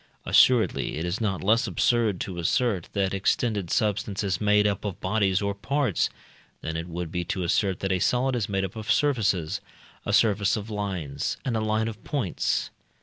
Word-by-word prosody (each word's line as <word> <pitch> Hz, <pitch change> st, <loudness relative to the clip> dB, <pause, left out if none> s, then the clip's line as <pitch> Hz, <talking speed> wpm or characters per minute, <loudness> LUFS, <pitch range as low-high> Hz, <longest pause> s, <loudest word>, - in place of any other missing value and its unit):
Assuredly 120 Hz, -10 st, +3 dB
it 80 Hz, -, -2 dB
is 90 Hz, +6 st, -2 dB
not 100 Hz, -4 st, -1 dB
less 110 Hz, +4 st, +3 dB
absurd 115 Hz, -6 st, +1 dB
to 90 Hz, -3 st, -4 dB
assert 105 Hz, -, 0 dB
that 100 Hz, -2 st, 0 dB
extended 100 Hz, -1 st, 0 dB
substance 105 Hz, 0 st, 0 dB
is 95 Hz, -2 st, -1 dB
made 105 Hz, 0 st, +4 dB
up 100 Hz, -2 st, 0 dB
of 100 Hz, -4 st, -4 dB
bodies 100 Hz, 0 st, +1 dB
or 100 Hz, 0 st, 0 dB
parts, 125 Hz, -, 0 dB, 0.5 s
than 80 Hz, -, -4 dB
it 80 Hz, +1 st, -4 dB
would 85 Hz, -1 st, -5 dB
be 90 Hz, -1 st, -2 dB
to 90 Hz, +2 st, -2 dB
assert 95 Hz, +2 st, 0 dB
that 95 Hz, -, -1 dB
a 95 Hz, -, +1 dB
solid 125 Hz, +6 st, +1 dB
is 115 Hz, -4 st, -2 dB
made 95 Hz, -1 st, 0 dB
up 95 Hz, -, -8 dB
of 110 Hz, 0 st, -2 dB
surfaces, 105 Hz, -, +1 dB, 0.4 s
a -, -, -2 dB
surface 105 Hz, -1 st, +3 dB
of 105 Hz, +1 st, -6 dB
lines, 90 Hz, -9 st, -3 dB
and 125 Hz, -4 st, -1 dB
a 110 Hz, -, 0 dB
line 110 Hz, +1 st, 0 dB
of 110 Hz, -1 st, -7 dB
points. 125 Hz, -, -1 dB
100 Hz, 190 wpm, -26 LUFS, 95-110 Hz, 0.5 s, made